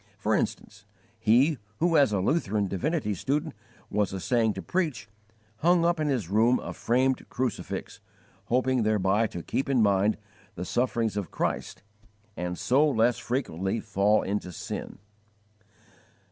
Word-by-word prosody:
For - - 0
instance, 105 0 -2 0.4
he 125 +6 +3 0.2
who, 170 0 +2
as 140 -7 +5
a 100 - +1
Lutheran 105 - +1
divinity 120 - -1
student, 145 - -2 0.4
was 105 -1 +1
essaying 110 +2 +1
to - - -6
preach, 170 - -2 0.5
hung 170 +5 +3
up 170 -1 +2
in 155 - 0
his 125 - -1
room 115 +6 +3
a - - -6
framed 130 +2 0
crucifix, 125 -4 -4 0.5
hoping 130 +1 +1
thereby 105 0 +2
to 85 -5 -7
keep 135 - -2
in 130 -5 +3
mind 100 +1 +3 0.4
the 90 - -5
sufferings 120 -2 0
of 100 -5 -3
Christ - - -3 0.5
and 90 0 -4
so 145 +5 +3
less 115 -2 +2
frequently 115 - -2
fall 105 0 +2
into 100 -2 -3
sin. 80 - -6
115 Hz, 140 wpm, -27 LUFS, 100-135 Hz, 0.5 s, as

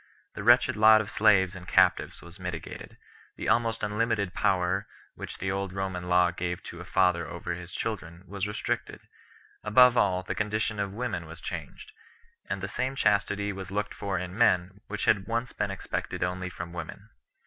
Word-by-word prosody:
The - - -6
wretched 120 +3 +5
lot 110 0 +7
of 110 -1 -4
slaves 95 -3 +4
and 90 -1 -10
captives - - +3
was 85 +3 -12
mitigated; 90 -3 -7 0.4
the - - -5
almost 115 -2 +1
unlimited 105 -2 0
power 95 +2 +1 0.3
which - - -8
the 95 +1 -2
old 95 -1 -3
Roman 95 -2 -3
law 90 0 +4
gave 90 0 -4
to 85 - -9
a - - -9
father 90 -3 +2
over 85 +1 -5
his 90 +1 -7
children 90 -6 -5
was 100 +1 -3
restricted; 105 - -3 0.6
above 125 +3 +6
all, 95 -4 +2
the - - -3
condition 105 0 -1
of 100 -1 -1
women 105 -6 -3
was 80 +2 -10
changed, 80 -4 -7 0.6
and 100 -1 -2
the - - -1
same 130 +5 -2
chastity 100 -2 +1
was 95 0 -7
looked 105 +2 -2
for 100 -4 -3
in 90 +1 -5
men 95 -3 +2
which 105 -1 -3
had 100 -3 +2
once 115 +2 -2
been - - -1
expected - - -3
only 90 0 -2
from 85 -1 -7
women. 85 -2 -8
95 Hz, 180 wpm, -28 LUFS, 90-105 Hz, 0.6 s, lot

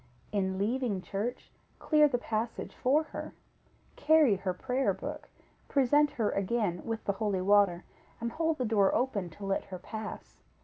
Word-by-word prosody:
In 190 -2 0
leaving 220 0 0
church, 215 +5 -4 0.3
clear 300 -1 +4
the 260 -4 0
passage 225 0 -3
for 285 +5 +2
her; 310 - -8 0.6
carry 305 -10 +4
her 190 0 -2
prayer 255 +8 0
book, - - -7 0.4
present 290 +2 +3
her 220 -4 0
again 195 -2 -1
with 225 -1 -4
the 200 - +1
holy 200 -2 -1
water, 195 -3 +4 0.4
and 235 0 -3
hold 325 +3 0
the 255 - -1
door 205 -3 +3
open 210 -8 0
to 195 +5 -9
let 195 0 -1
her 185 - -7
pass. 215 +4 -8
220 Hz, 160 wpm, -30 LUFS, 195-255 Hz, 0.6 s, clear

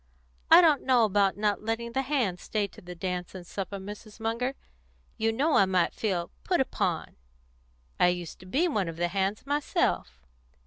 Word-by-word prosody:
I - - +10
don't 310 -5 +4
know 250 -3 +4
about 200 -1 +2
not 205 -1 0
letting 225 +2 -3
the 265 - 0
hands 250 -10 -1
stay 210 -2 -1
to - - -15
the 180 0 -9
dance 180 +1 -4
and 180 -2 -8
supper, 200 +2 -5
Mrs. 210 +3 -10
Munger. 230 +4 -1 0.6
You 225 0 +1
know 285 +8 +1
I 195 - +6
might 185 -2 +2
feel 180 -6 -2
'put 365 - +1
upon.' 265 - -1 0.8
I - - +6
used 175 -2 -2
to 185 - -13
be 295 - +2
one 210 - 0
of 165 -1 -6
the 175 0 0
hands 195 +4 -1
myself. 285 - 0
210 Hz, 180 wpm, -28 LUFS, 185-250 Hz, 0.8 s, I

